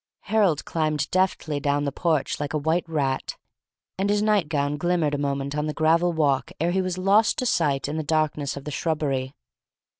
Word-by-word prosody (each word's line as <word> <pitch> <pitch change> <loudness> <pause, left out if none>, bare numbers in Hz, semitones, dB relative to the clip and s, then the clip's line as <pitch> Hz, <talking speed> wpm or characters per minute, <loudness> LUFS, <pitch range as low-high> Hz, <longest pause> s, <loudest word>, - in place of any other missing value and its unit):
Harold 195 -8 +1
climbed 155 -3 -1
deftly 180 -5 0
down 145 +1 0
the 140 - -1
porch 155 -1 0
like 145 +1 -3
a - - +3
white 160 +3 0
rat, 135 -4 -1 0.6
and 195 +1 +1
his 205 0 +2
night 210 -7 +2
gown 145 -2 0
glimmered 165 -1 0
a - - 0
moment 140 0 -2
on 150 0 -1
the 150 - -3
gravel 165 +3 +3
walk 145 -5 +1
ere 170 +3 +1
he 190 +1 +1
was 185 -1 -3
lost 200 +4 +3
to 255 - -1
sight 145 - +1
in 150 +2 -3
the 160 - -2
darkness 150 -2 -1
of 140 - -7
the 150 - -6
shrubbery. 140 -4 -2
155 Hz, 200 wpm, -24 LUFS, 145-175 Hz, 0.6 s, a